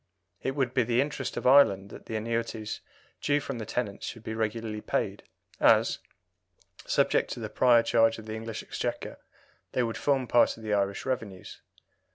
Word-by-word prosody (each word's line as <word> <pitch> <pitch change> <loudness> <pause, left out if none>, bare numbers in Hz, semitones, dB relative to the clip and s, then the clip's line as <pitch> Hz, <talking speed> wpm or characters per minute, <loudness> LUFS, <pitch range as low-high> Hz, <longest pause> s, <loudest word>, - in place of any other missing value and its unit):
It 135 - -2
would 130 -3 0
be 130 - +3
the 120 +1 +1
interest 140 -1 -2
of - - -4
Ireland 105 -7 +5
that - - -11
the 110 - -4
annuities 115 -1 -3 0.4
due 145 0 +2
from 135 -4 -5
the 110 - -6
tenants 110 -5 -3
should 115 -1 -7
be 110 - -4
regularly 110 -1 -3
paid, - - -2 0.4
as, - - +4 0.9
subject - - +2
to - - -8
the - - -5
prior 120 -2 +5
charge 115 -1 +3
of 110 - -10
the 110 - -6
English 110 0 -5
Exchequer, - - -4 0.5
they 125 - +2
would 115 -1 -3
form 135 -3 +1
part 120 -1 +3
of 115 - -12
the 105 -1 -1
Irish 100 -1 0
revenues. 110 -8 -5
115 Hz, 180 wpm, -28 LUFS, 110-125 Hz, 0.9 s, Ireland